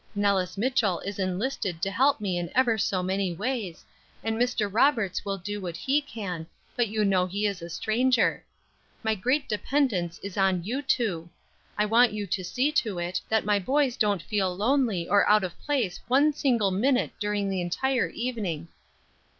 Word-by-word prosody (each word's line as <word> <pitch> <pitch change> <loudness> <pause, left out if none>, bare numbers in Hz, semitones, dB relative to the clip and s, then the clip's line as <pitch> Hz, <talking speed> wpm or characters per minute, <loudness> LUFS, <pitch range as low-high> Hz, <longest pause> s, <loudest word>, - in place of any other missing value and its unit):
Nellis 195 -3 +1
Mitchell 220 -5 +1
is 200 0 -6
enlisted 190 -1 -2
to 195 - 0
help 270 +6 +3
me 190 -4 -1
in 175 -1 -4
ever 245 -3 +4
so 195 -3 0
many 190 0 -1
ways, 210 -4 -3 0.4
and 225 0 -1
Mr. 240 -2 +1
Roberts 220 -2 +2
will 195 -1 -2
do 205 +3 -5
what 175 -3 -5
he 275 +8 +1
can, 185 - -6 0.3
but 240 -1 +1
you 215 0 0
know 185 -2 +2
he 200 +3 -2
is 200 -4 -1
a 170 - -7
stranger. 240 +7 +1 0.6
My 220 0 +2
great 255 +8 0
dependence 210 - 0
is 200 -1 -6
on 190 -3 +2
you 245 +9 -2
two. 205 - -1 0.5
I 210 - +2
want 230 +2 +4
you 210 -1 -3
to 190 0 -2
see 255 +11 0
to 225 -11 0
it, 175 +2 -2
that 220 -2 +1
my 205 -1 +2
boys 265 +5 +1
don't 205 -7 +1
feel 190 -4 -1
lonely 220 -6 +1
or 200 0 +4
out 210 -1 +5
of 180 -2 -4
place 255 -11 -1
one 280 +5 +4
single 235 -9 +1
minute 250 +7 +1
during 205 -1 -1
the 190 -2 -1
entire 250 +9 0
evening." 200 -10 -4
205 Hz, 180 wpm, -27 LUFS, 185-245 Hz, 0.6 s, out